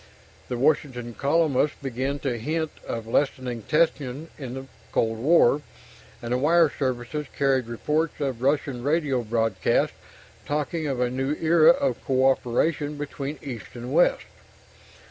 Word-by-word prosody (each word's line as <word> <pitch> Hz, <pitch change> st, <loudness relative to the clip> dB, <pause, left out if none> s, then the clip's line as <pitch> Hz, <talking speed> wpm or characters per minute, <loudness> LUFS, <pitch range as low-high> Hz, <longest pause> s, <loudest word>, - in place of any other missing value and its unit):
The 125 Hz, -, -2 dB
Washington 125 Hz, -3 st, 0 dB
columnists 145 Hz, +1 st, +1 dB
began 135 Hz, +1 st, -2 dB
to 125 Hz, -4 st, -2 dB
hint 160 Hz, +6 st, -2 dB, 0.2 s
of 115 Hz, -1 st, -4 dB
lessening 125 Hz, -1 st, -1 dB
tension 150 Hz, +1 st, 0 dB
in 130 Hz, -3 st, -7 dB
the 135 Hz, 0 st, -6 dB, 0.3 s
cold 115 Hz, -1 st, 0 dB
war, 145 Hz, 0 st, +4 dB, 0.6 s
and 120 Hz, +1 st, -2 dB
the 125 Hz, -, +1 dB
wire 160 Hz, +2 st, +4 dB
services 130 Hz, +2 st, -2 dB
carried 135 Hz, -3 st, +2 dB
reports 150 Hz, +7 st, -1 dB
of 135 Hz, -5 st, -2 dB
Russian 140 Hz, -2 st, 0 dB
radio 145 Hz, -2 st, +1 dB
broadcasts 115 Hz, -3 st, +1 dB, 0.5 s
talking 150 Hz, +2 st, -1 dB
of 135 Hz, -3 st, -2 dB
a 125 Hz, -1 st, +1 dB
new 135 Hz, +3 st, -1 dB
era 160 Hz, 0 st, +5 dB
of 275 Hz, +2 st, +2 dB
cooperation 135 Hz, +3 st, +1 dB
between 145 Hz, 0 st, -5 dB
East 125 Hz, -6 st, -8 dB
and 120 Hz, +2 st, -6 dB
West. 170 Hz, +3 st, +3 dB
135 Hz, 135 wpm, -25 LUFS, 125-150 Hz, 0.6 s, era